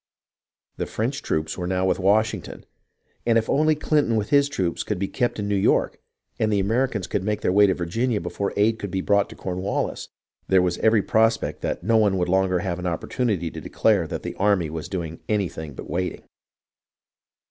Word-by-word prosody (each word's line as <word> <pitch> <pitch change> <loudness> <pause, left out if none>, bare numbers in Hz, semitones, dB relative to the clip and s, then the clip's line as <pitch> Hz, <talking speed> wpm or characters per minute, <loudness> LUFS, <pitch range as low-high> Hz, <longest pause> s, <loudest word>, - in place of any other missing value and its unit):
The - - -3
French 130 +6 -2
troops 80 - -2
were 90 - -2
now 95 0 0
with 95 - +1
Washington; 105 +4 0 0.6
and 115 -1 +3
if 110 - +1
only 155 +2 +3
Clinton 150 -5 +1
with 105 -1 -1
his 140 0 +4
troops 95 -11 -1
could 105 - -2
be 100 +2 -1
kept 120 +3 -1
in 105 -1 -3
New 105 - 0
York, 95 - +2 0.4
and 110 -1 +1
the 100 - +2
Americans 110 0 0
could 100 - -2
make 105 +1 -1
their - - +1
way 100 +2 +6
to 95 - +1
Virginia 110 +7 -1
before 90 +3 -3
aid 110 +2 +2
could 100 - -4
be 95 0 -2
brought 100 +1 +1
Cornwallis, 95 +1 -3 0.4
there 95 -1 +4
was 90 -1 -1
every 110 -2 +3
prospect 110 +1 +1
that - - -3
no 115 +3 +3
one 100 -3 +3
would 90 -1 0
longer 95 -1 +2
have 90 -2 -3
an 90 - -3
opportunity 90 0 -1
to - - -7
declare - - +1
that - - -5
the - - -4
army 95 -6 +2
was 80 -1 -5
not - - -22
doing 85 -4 -4
anything 85 -8 -2
but - - -8
waiting. 90 +4 -3
100 Hz, 200 wpm, -24 LUFS, 90-110 Hz, 0.6 s, way